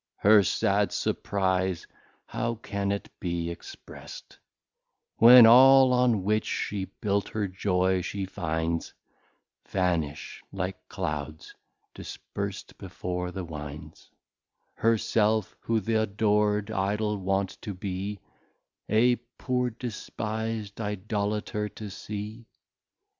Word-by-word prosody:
Her 105 +1 +6
sad 95 - +1
Surprize 95 -3 -1 0.4
how 115 0 -2
can 100 -2 -3
it 100 - -3
be 85 -2 -2
exprest, 85 - -11 0.8
When 120 +1 +10
all 130 +2 +8
on 125 -5 +3
which 105 +2 +1
she 100 -2 -2 0.2
built 100 -1 0
her 105 -2 -2
Joy 95 0 +1
she 100 +2 -3
finds, 80 -2 -3 0.7
Vanish, 85 -6 -1
like 95 -1 -5
Clouds, 75 -5 -5 0.4
disperst - - -7
before 90 0 -4
the 95 +1 -5
Winds; 75 0 -9 0.6
Her 115 0 +2
self, 110 0 +1
who 115 -1 0
th'adored 105 -1 +1
Idol 105 +1 -1
wont 95 0 -1
to 100 - -5
be, 95 +2 -4 0.7
A 120 +3 +4 0.2
poor 125 -1 0
despis'd 110 -2 -5
Idolater 105 +1 -2
to 105 -1 -8
see? 105 +3 -7
100 Hz, 100 wpm, -27 LUFS, 95-110 Hz, 0.8 s, When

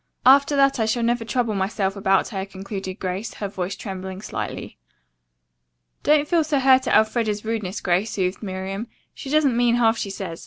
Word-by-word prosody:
After 280 +3 +6
that 275 -2 +3
I 220 - +1
shall 235 +2 0
never 235 0 +1
trouble 230 0 -1
myself 195 0 -1
about 195 -1 +2
her," 195 -4 -3
concluded 195 -1 -6
Grace, 185 +4 -4
her 205 - -4
voice 190 0 -4
trembling 190 -1 -7
slightly. - - -6 1.2
"Don't 300 0 +3
feel 335 -1 +3
so 300 -1 0
hurt 260 0 +4
at - - +3
Elfreda's 215 -1 0
rudeness, 215 -3 -3
Grace," 185 +4 +1
soothed 185 -2 -2
Miriam. 195 +2 -5 0.3
"She 270 - -8
doesn't 290 -4 +3
mean 240 0 +3
half 230 -1 +3
she 200 - -3
says. 190 -4 -6
215 Hz, 180 wpm, -23 LUFS, 190-245 Hz, 1.2 s, After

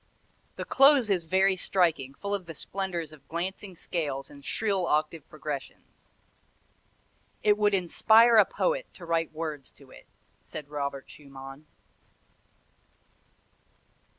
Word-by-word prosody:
The - - -5
close 270 -5 +5
is 180 -4 +1
very 190 +3 +3
striking, 165 -8 0
full 200 +5 -4
of 190 -4 -3
the 165 - -8
splendors 175 -2 -4
of 140 -2 -17
glancing 185 +3 -5
scales 145 -6 -4
and 140 -1 -14
shrill 195 -2 -1
octave 155 0 -1
progressions. 150 -2 -8 1.3
"It 210 -1 +5
would 210 -1 +2
inspire 220 +6 +5
a 210 - +8
poet - - -1
to 175 - -10
write 165 -1 0
words 155 -3 -5
to - - -18
it," - - -15 0.4
said 150 -2 -9
Robert 140 -2 -4
Schumann. 135 0 -12
170 Hz, 125 wpm, -28 LUFS, 150-195 Hz, 1.3 s, a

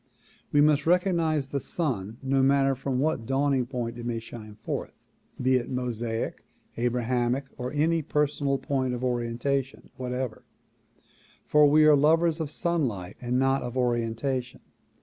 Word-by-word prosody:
We 145 - +5
must 150 0 +3
recognize 165 -5 +2
the 140 - -1
sun 115 - -3
no 135 0 +2
matter 135 0 +4
from 135 0 -2
what 135 -4 0
dawning 135 -2 +1
point 120 -2 -4
it - - -6
may 120 -1 -1
shine 110 -2 -9
forth, - - -5 0.5
be 130 0 +3
it 120 - -4
Mosaic, 120 -3 -3 0.3
Abrahamic 125 +2 0
or 125 0 -4
any 160 +3 +2
personal 145 -2 0
point 130 -2 -1
of 125 - -6
orientation 125 +2 -2
whatever, 125 -2 -4 1.0
for 150 -1 +5
we 155 +1 +6
are 155 -1 +7
lovers 160 +3 +3
of 160 -3 -2
sunlight 135 - -2
and 125 0 0
not 135 +1 +2
of 125 +1 -5
orientation. 125 +1 -1
130 Hz, 145 wpm, -27 LUFS, 120-145 Hz, 1.0 s, are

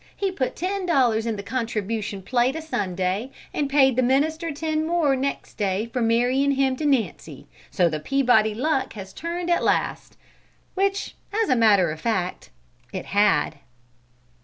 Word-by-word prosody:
He 390 -1 0
put 265 -9 -2
ten 375 +2 -2
dollars 240 -8 +2
in 225 - -1
the 200 - -6
contribution 215 -3 -3
plate 245 +5 +1
a 320 - -4
Sunday, 190 - -2 0.2
and 285 -2 -1
paid 270 -3 +4
the 255 - +3
minister 310 +6 +1
ten 310 +1 -1
more 320 -4 +2
next 275 +1 -4
day 200 +1 0
for 250 - -1
marryin' 245 +5 +2
him 265 -1 +1
to 300 - -1
Nancy; 175 - -1 0.2
so 180 - +2
the 155 -2 -2
Peabody 220 - +2
luck 265 +1 0
has 190 -2 -9
turned 345 +1 -3
at 345 - +2
last!" - - -1 0.6
which, 390 +1 -1 0.3
as - - -3
a - - +4
matter 205 -7 +4
of 155 0 -7
fact, 185 - -2 0.4
it - - -5
had. 200 -7 +3
255 Hz, 160 wpm, -24 LUFS, 205-295 Hz, 0.6 s, paid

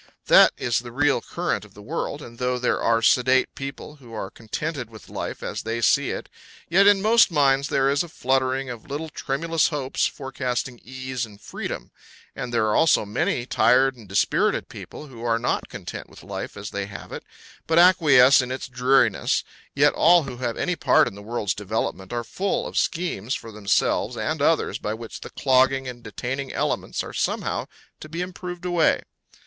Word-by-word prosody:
That - - +7
is 120 -2 0
the 120 0 -9
real 140 0 +2
current - - -2
of - - -16
the - - -12
world, - - -4
and 115 0 -12
though 125 0 0
there 125 - 0
are 115 0 +2
sedate 130 +3 +3
people 140 +2 -7
who 120 -5 -12
are 95 -3 -5
contented 125 +3 -5
with 110 -1 -14
life - - -5
as - - -4
they 115 +1 -3
see 115 - +3
it, - - -5 0.4
yet 195 +4 +5
in 200 -1 +5
most 230 +2 +5
minds 140 -3 +3
there 135 -1 +2
is 140 +1 +2
a 175 - -5
fluttering 130 -1 0
of 120 0 -8
little 150 +3 -4
tremulous 160 +4 0
hopes 140 -4 -1
forecasting 130 -2 -4
ease 130 0 -5
and 105 -3 -8
freedom; - - -6 0.4
and 125 - -5
there 115 -2 +2
are 105 - +1
also 160 -9 +4
many 130 - -1
tired 130 +1 +3
and 110 -5 -15
dispirited 100 - +1
people - - -9
who 120 -5 -11
are 115 -1 +2
not 120 - -1
content - - -8
with - - -15
life - - -6
as 105 +1 -7
they 100 -1 -3
have 100 - -10
it, - - -6 0.4
but 165 - +2
acquiesce 145 -8 +7
in 125 - -5
its 130 - -4
dreariness; 125 -3 +2 0.3
yet - - +4
all 170 0 +5
who 125 -3 -7
have 120 -2 -3
any 180 - 0
part 145 -6 +4
in - - -5
the 100 - -11
world's 105 -1 -2
development 100 -2 -3
are 120 -1 -2
full 190 +11 -2
of - - -7
schemes 155 - -1
for 115 - -8
themselves 105 -2 0
and - - -2
others - - +2
by 105 +1 -3
which 115 0 -9
the - - -8
clogging 135 0 +2
and 120 -1 -7
detaining 130 +5 -5
elements - - -2
are - - -9
somehow - - -2 0.3
to 155 - -10
be 165 +3 -4
improved 180 -1 -7
away. 175 -2 +2
130 Hz, 190 wpm, -24 LUFS, 115-145 Hz, 0.4 s, That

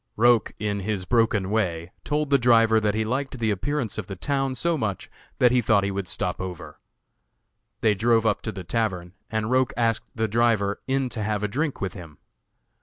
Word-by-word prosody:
Roch 120 0 +4
in 105 -1 -2
his 100 -1 -3
broken 110 -4 +1
way 90 -6 -1
told 150 -1 -1
the 140 - +5
driver 115 -2 +5
that 105 -1 0
he 110 - +1
liked 130 +3 -2
the 110 -2 0
appearance 120 +2 -2
of 95 - -6
the 95 - -6
town 135 +5 -1
so 170 +6 0
much 110 - -3 0.3
that 125 -1 +5
he 125 0 +3
thought 105 -3 +3
he 100 - -1
would 100 -1 -3
stop 90 +1 -2
over. 85 -5 -7 1.0
They 110 -3 +4
drove 115 +2 +2
up 105 -2 +1
to 110 - -4
the 95 -3 -7
tavern 90 -4 -2 0.2
and 110 +1 -2
Roch 130 -1 +3
asked 115 -2 0
the 110 -1 0
driver 110 -2 +1
in 135 0 +1
to 110 -2 -5
have 105 0 -1
a - - +1
drink 145 +7 -2
with 95 -2 -2
him. 80 -6 -11
110 Hz, 200 wpm, -25 LUFS, 100-120 Hz, 1.0 s, the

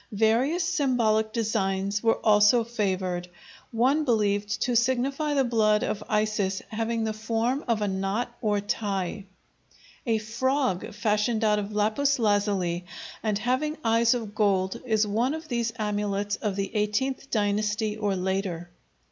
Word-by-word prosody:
Various 245 - +2
symbolic 245 -11 +1
designs 200 -3 -1
were 225 -1 +2
also 210 +2 +5
favored, 190 -6 -2 0.4
one 260 +7 +2
believed 205 -5 0
to 245 - 0
signify 265 +5 +1
the 275 - +3
blood 215 -3 +2
of 215 - -2
Isis 210 -3 0
having 225 +1 -2
the 220 -1 -1
form 230 +5 -1
of 225 -3 +1
a - - 0
knot 195 +5 -2
or 210 -2 +1
tie. 200 -2 -3 0.8
A 225 -1 +3
frog 230 -1 -1
fashioned 215 +1 0
out 210 -1 +3
of 205 0 -5
lapis 220 +7 +1
lazuli 200 -6 0 0.4
and 215 -2 0
having 260 +8 -1
eyes 230 +1 +3
of 220 -4 -5
gold 195 -3 +1
is 220 -2 +2
one 235 +8 0
of 320 0 -8
these 235 -2 -1
amulets 205 -1 -1
of 205 -3 -2
the 195 0 -3
XVIII 215 +6 0
dynasty 210 0 0
or 205 -2 -1
later. 185 -2 -2
215 Hz, 140 wpm, -26 LUFS, 205-235 Hz, 0.8 s, also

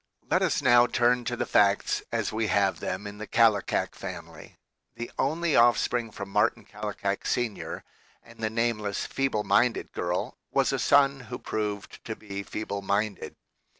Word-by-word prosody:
Let - - +4
us - - +1
now 120 -1 +6
turn 120 0 +2
to 120 - -1
the - - -2
facts 100 -1 +3
as - - -1
we 110 0 0
have 95 -3 +2
them 95 +3 -4
in 105 0 -8
the 110 - -6
Kallikak 115 -2 +2
family. - - -9 0.4
The 120 +1 -6
only 160 +3 +1
offspring 120 0 +3
from 100 -2 -7
Martin 105 +2 +1
Kallikak 105 -1 -4
Sr. 120 -4 -2 0.4
and - - -17
the 110 -1 -1
nameless 110 -3 -1
feeble 135 -6 -1
minded 120 +2 +2
girl 90 +1 -2
was - - +1
a - - 0
son 140 -1 +4
who - - -4
proved 105 -2 -4
to 110 - -4
be 100 -2 -6
feeble 100 0 -5
minded. 100 +1 -2
110 Hz, 160 wpm, -27 LUFS, 100-120 Hz, 0.4 s, now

